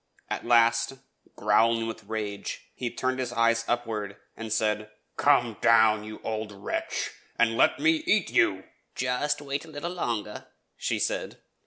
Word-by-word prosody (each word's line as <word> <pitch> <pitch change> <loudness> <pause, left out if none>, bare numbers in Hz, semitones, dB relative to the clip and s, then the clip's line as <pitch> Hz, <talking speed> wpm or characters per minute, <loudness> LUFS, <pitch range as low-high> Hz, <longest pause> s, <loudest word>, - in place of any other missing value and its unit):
At - - -3
last, 115 +1 +4 0.4
growling 115 0 +3
with 115 -1 -6
rage, 105 -1 -4
he 125 - -3
turned 130 +2 -2
his 125 -2 -2
eyes 115 -1 +2
upward, 110 -4 -2 0.2
and 110 -1 -7
said, 105 0 0 0.3
"'Come 120 -6 +3
down, 110 -2 +5
you 110 0 -8
old 110 -1 -3
wretch, 100 -1 -3 0.3
and 115 -1 +3
let - - +4
me 320 0 +3
eat 210 - +2
you.'' 95 -1 +3 0.3
"Just 145 +4 -1
wait 140 0 -3
a - - -13
little 155 +3 -5
longer," 115 - -3 0.3
she - - -1
said. - - -2
115 Hz, 150 wpm, -27 LUFS, 110-130 Hz, 0.4 s, down